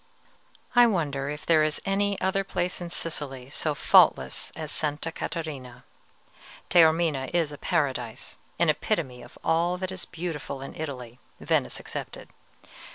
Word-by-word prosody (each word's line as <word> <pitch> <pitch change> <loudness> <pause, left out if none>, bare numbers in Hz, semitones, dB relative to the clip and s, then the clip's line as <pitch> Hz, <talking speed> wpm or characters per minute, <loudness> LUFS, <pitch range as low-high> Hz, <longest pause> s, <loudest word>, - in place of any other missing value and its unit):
I 245 0 +8
wonder 145 -9 0
if 150 +1 -6
there 160 -2 +5
is 155 0 0
any 200 0 +1
other 190 +1 +1
place 180 -1 -2
in 175 - -4
Sicily 135 -6 -4
so 150 0 -1
faultless - - +4
as 155 -2 -5
Sta. 150 +2 -2
Catarina? 135 -8 -5 0.9
Taormina 160 -5 +4
is 165 -4 +2
a 145 - -8
paradise, 130 -9 -2 0.2
an - - +3
epitome 125 -1 0
of - - -14
all 170 +2 +2
that 185 0 -3
is 190 -1 -5
beautiful 160 -5 -5
in 135 - -7
Italy, 125 -6 -6 0.2
Venice - - 0
excepted. - - -7
155 Hz, 140 wpm, -27 LUFS, 140-175 Hz, 0.9 s, I